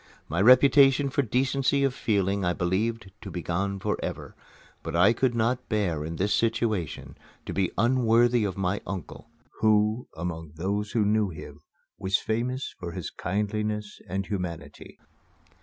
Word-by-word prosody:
My 85 +4 -1
reputation 135 +3 +6
for 140 - +2
decency 135 +3 +1
of 135 -2 +2
feeling 100 -5 0
I 90 0 +1
believed 95 +4 -1
to 100 - -7
be 90 -2 -5
gone 100 +3 -1
forever; - - -4 0.5
but - - -5
I 95 +7 +5
could 120 0 0
not 120 +3 0
bear, 90 -9 0
in 80 +2 -5
this 100 +5 0
situation, 110 -8 -1 0.3
to - - -5
be 95 -2 +1
unworthy 120 -1 +3
of 100 -2 -2
my 95 +1 -1
uncle, 95 -4 -7 0.3
who, 110 +2 +2
among 80 -3 -5
those 100 +5 -2
who 110 -3 +2
knew 105 -1 +2
him, 80 - -10 0.4
was 95 +1 +1
famous 125 +4 -2
for 85 -2 -6
his - - -5
kindliness 105 +2 -3
and 95 +2 -2
humanity. 85 -7 -6
105 Hz, 150 wpm, -27 LUFS, 90-115 Hz, 0.5 s, reputation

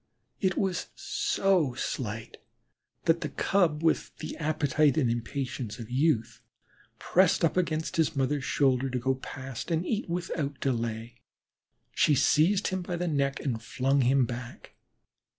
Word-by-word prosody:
It 190 -3 0
was 190 -3 -1
so 195 - +1
slight 110 -3 -4 0.7
that 165 0 +2
the 150 - -2
Cub, 165 -1 +1
with 165 - +1
the 155 - -6
appetite 150 -2 +2
and 125 -7 +2
impatience 120 -1 -4
of 115 -1 -9
youth, 130 -3 +1 0.6
pressed 180 -2 +3
up 165 - 0
against 160 -3 -1
his 160 -3 +2
mother's 135 +1 0
shoulder 135 -1 +2
to 130 - -2
go 130 +2 +1
past 130 0 -7
and 165 +1 0
eat 215 -2 -2
without 165 -5 -3
delay. 115 -2 -3 0.7
She 150 - +3
seized 180 +9 +3
him 185 -1 -2
by 175 0 -4
the 175 +1 -2
neck 140 -3 0
and 120 -6 -2
flung 135 +4 +1
him 130 +1 +4
back. 120 0 -8
140 Hz, 145 wpm, -28 LUFS, 125-165 Hz, 0.7 s, him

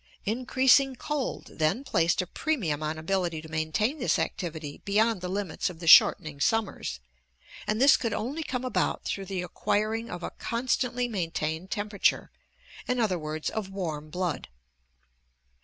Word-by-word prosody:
Increasing 260 +4 +3
cold 290 +1 -3
then 160 - +1
placed 170 -9 +2
a - - -7
premium 180 - -1
on 155 +1 -2
ability 170 0 -1
to - - -9
maintain 160 - -1
this 250 - +2
activity 160 -4 -4
beyond 215 0 +2
the 180 - -4
limits 195 -1 -2
of 180 - -9
the 170 - -7
shortening 155 -2 +7
summers, 195 - 0 0.7
and 215 +1 0
this 275 +2 +7
could 230 - -2
only 260 +10 -3
come 255 -4 -3
about 250 - 0
through 195 - -3
the 185 -2 -3
acquiring 215 +5 -1
of 175 0 -6
a - - -4
constantly 245 0 -1
maintained 165 -4 -3
temperature, 205 -1 0 0.6
in 250 - 0
othu 170 -9 -1
..is, - - -2
of 215 -3 -4
warm 160 -6 -4
blood. 180 -2 -2
195 Hz, 150 wpm, -28 LUFS, 160-235 Hz, 0.7 s, shortening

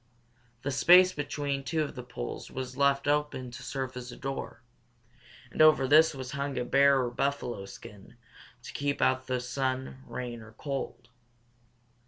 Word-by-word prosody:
The 140 - -1
space 180 +6 +6
between 145 -2 -3
two 155 +4 0
of 145 - -5
the 125 - -7
poles 120 - -7
was 130 -1 -6
left 140 0 +2
open 145 -4 0
to - - -9
serve 130 -2 -4
as 125 0 -7
a - - -10
door, 135 -2 -5 0.9
and - - 0
over 155 -4 +6
this 155 +2 +6
was 130 -1 -6
hung 140 -1 -3
a 125 - -1
bear 140 +1 +5
or 120 - -2
buffalo 125 -6 -2
skin 100 +2 -12 0.5
to - - -9
keep 145 0 -1
out 130 0 +2
the 130 -1 0
sun, 130 +1 -3
rain, 120 -2 -5
or 110 0 -13
cold. 135 -2 -5
135 Hz, 165 wpm, -29 LUFS, 125-140 Hz, 0.9 s, space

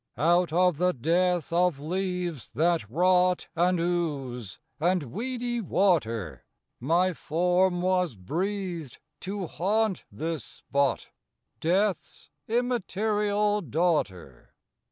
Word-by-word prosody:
Out 170 +5 +3
of 180 -1 +3
the 180 0 +3
death 170 +4 +1
of 175 -4 +2
leaves 180 - -3
that 165 -6 +1
rot 180 +5 +2
And 175 +1 +2
ooze 140 - -2 0.2
and 175 +1 +2
weedy 240 +2 -2
water, 140 - 0 0.4
My 175 +8 +2
form 180 +3 +1
was 180 -7 +1
breathed 170 - -3 0.2
to 195 0 -4
haunt 205 +4 0
this 160 0 -3
spot, 140 -1 -2 0.5
Death's 190 +4 -1 0.2
immaterial 210 -3 0
daughter. 145 - -2
180 Hz, 95 wpm, -27 LUFS, 155-190 Hz, 0.5 s, Out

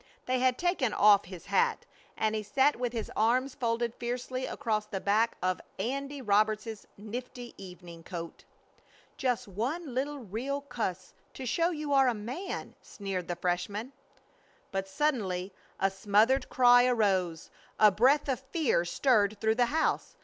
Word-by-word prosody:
They 255 0 0
had 255 0 +2
taken 345 - 0
off 205 -1 +6
his 180 -1 -10
hat 470 0 +1 0.3
and 220 0 +1
he 215 - -1
sat 265 +7 +2
with 245 -1 -2
his 230 -2 -4
arms 250 +5 +2
folded 235 -1 -1
fiercely 250 +2 -4
across 215 -2 -2
the 195 -3 -4
back 215 +4 +1
of 185 0 0 0.2
"Andy" 275 +6 -3
Roberts's 215 +1 +1
nifty 240 +3 -7
evening 175 -2 -11
coat. 170 0 -7 0.7
"Just 250 -5 -1
one 255 - -3
little 285 +3 -2
real 255 +5 -4
cuss 215 -9 -4 0.2
to 265 - -6
show 335 +8 +1
you 300 -4 -3
are 270 -1 +5
a 245 - +2
man," 250 - -5
sneered 195 -3 -5
the 175 - -2
freshman. 190 +7 -2 0.8
But 195 0 -2
suddenly 195 -7 -1 0.3
a 195 - +2
smothered 210 +7 +2
cry 245 0 +6
arose. 190 -8 +1 0.3
A 210 -1 +7
breath 265 +10 +3
of 265 -3 0
fear 270 - 0
stirred 210 0 +2
through 220 0 +2
the 240 +1 +2
house. 315 +5 0
230 Hz, 150 wpm, -30 LUFS, 200-260 Hz, 0.8 s, A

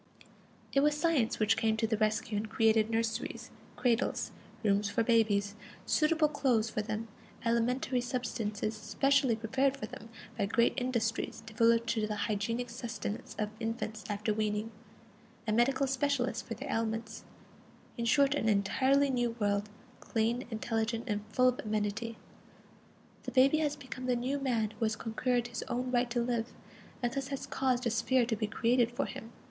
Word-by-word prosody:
It 275 - +4
was 295 +1 +3
Science 300 -8 +2
which 215 0 +3
came 220 -1 +1
to 225 - +1
the 220 0 +1
rescue 215 0 0
and 210 +1 -2
created 220 0 +3
nurseries, 225 0 -2 0.2
cradles, 245 -1 +1 0.3
rooms 200 -1 +2
for 215 +3 +1
babies, 210 -3 +2 0.3
suitable 310 0 +3
clothes 245 -7 +1
for 215 - -1
them, 215 +1 -4 0.4
alimentary 245 +2 +1
substances 230 -4 -2
specially 250 +4 +2
prepared 265 +5 +1
for - - -4
them 250 -2 -10 0.3
by 200 - 0
great 235 +3 +3
industries 235 -3 -1
devoted 230 +1 +3
to 220 -2 0
the 210 - -2
hygienic 230 +4 -2
sustenance 230 -3 -5
of 210 0 -1
infants 225 -1 -3
after 210 +1 0
weaning, 215 +1 -1 0.7
and 215 -1 +1
medical 260 +4 +3
specialists 265 -3 0
for 230 - -6
their - - -6
ailments; 225 0 -2 0.7
in 235 - -2
short, 280 +4 +4
an 225 -6 +1
entirely 260 +8 +3
new 240 -2 0
world, 205 0 0 0.3
clean, 230 +3 -1
intelligent, 225 0 -1
and 210 -3 -2
full 255 +3 +3
of 250 - -3
amenity. 215 +2 -2 1.0
The - - -6
baby 270 +4 +5
has 295 -2 0
become 260 -2 -7
the 250 - +2
new 260 +4 -1
man 230 -6 0
who 225 - -2
has 220 0 0
conquered 240 +2 -1
his 240 - -5
own 250 0 -2
right 245 0 +2
to 240 0 0
live, 235 -1 -2 0.5
and 240 -1 0
thus 275 -1 -2
has 275 -1 -4
caused 255 -2 0
a 235 - +2
sphere 250 +2 +2
to 230 -1 0
be 215 0 -2
created 235 +2 +2
for 245 +3 -1
him. 225 - -8
230 Hz, 165 wpm, -32 LUFS, 220-255 Hz, 1.0 s, baby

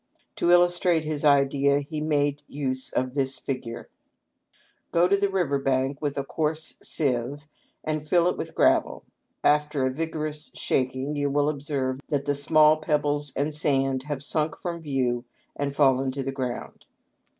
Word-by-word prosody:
To 170 - +1
illustrate 175 -1 +4
his 155 -1 -3
idea 140 -1 +4
he 150 +2 -5
made 145 -1 +1
use 130 -2 -3
of 130 0 -1
this 135 -1 -1
figure: 125 -3 -5 0.5
" - - -38
Go 170 +1 +4
to 200 - +4
the 200 0 +1
river 175 -8 0
bank 135 +1 0
with 145 -2 -2
a 140 - 0
coarse 155 +2 -3
sieve 135 0 -1 0.4
and 155 -1 -3
fill 175 -1 +4
it 180 - +1
with - - -6
gravel. - - +2 0.4
After 150 -2 +2
a 130 - +1
vigorous 155 0 -4
shaking 130 +3 -1
you 145 -1 0
will 145 +1 +2
observe 140 -3 -2
that 140 -2 -1
the 145 - +1
small 155 +2 +5
pebbles 145 -2 0
and 145 +3 0
sand 135 -3 +1
have 145 -2 -3
sunk 150 +1 -1
from 170 -2 -4
view 130 -5 -1 0.3
and 140 -1 -3
fallen 135 -2 +3
to 135 0 -3
the 135 - -2
ground. 130 -2 -5
145 Hz, 160 wpm, -26 LUFS, 135-155 Hz, 0.5 s, small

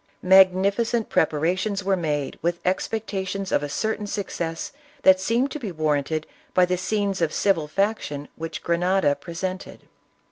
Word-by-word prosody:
Magnificent 195 +5 +4
preparations 185 +7 +1
were 195 0 +2
made 150 -5 -2
with 170 +1 -1
expecta 195 +1 -2
tions 195 0 -4
of - - +2
a 145 - -4
certain 215 +5 -2
success 170 -5 -4 0.3
that 190 0 +7
seemed 235 +8 +1
to 300 - -5
be 220 -8 -5
warranted 155 -1 -1 0.3
by 180 - +6
the 180 0 0
scenes 200 0 -1
of 165 -2 +2
civil 170 -6 +1
faction 155 -6 -1
which 165 0 -6
Grenada 175 -2 +2
presented. 185 +6 -6
185 Hz, 145 wpm, -24 LUFS, 165-200 Hz, 0.3 s, that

